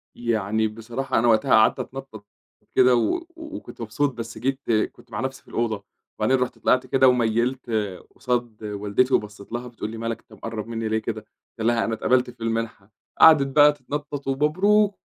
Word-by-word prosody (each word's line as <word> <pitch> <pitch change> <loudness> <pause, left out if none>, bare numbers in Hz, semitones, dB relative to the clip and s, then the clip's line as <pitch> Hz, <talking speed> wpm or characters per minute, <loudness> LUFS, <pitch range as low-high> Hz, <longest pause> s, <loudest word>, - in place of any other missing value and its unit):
يعني، 110 -2 0
بصراحة 115 +5 -2
أنا 120 - +2
وقتها 110 -2 +3
قعدت 110 - +5
أتنطط، 135 -6 -8 0.5
كده 125 -1 +6
و 340 - 0
وكُنت 315 - -9
مبسوط 125 +5 -1
بس 115 -2 -7
جيت 135 +4 -1 0.3
كُنت 120 - -21
مع 105 - -4
نَفْسي 130 0 -4
في - - -37
الأوضة، 110 -3 -2 0.4
وبعدين 130 0 +3
رُحت 125 0 -2
طلعت 130 0 +2
كده 130 +1 +4
وميلت 125 +1 +1 0.5
قصاد 120 -4 -2
والدتي 105 +5 0
وبصيت 105 -1 -2
لها، 120 +1 -4
بتقول 115 -3 -6
لي: 115 - -7
"ما 115 - -6
لك 115 -1 -3
أنت - - -21
مقرّب 115 -1 -6
مني 115 -1 -3
ليه 110 - +1
كده،" 110 0 -4 0.4
قُلت 110 - 0
لها: 120 -1 +2
"أنا 115 - -2
اتقَبلت 125 +3 +2
في 120 -1 -10
المنحة،" 115 -3 -3 0.3
قعدت 155 -4 +8
بقى 150 0 +8
تتنطط 145 +1 -6
"ومبروك، 190 +10 +2
120 Hz, 180 wpm, -24 LUFS, 110-135 Hz, 0.5 s, قعدت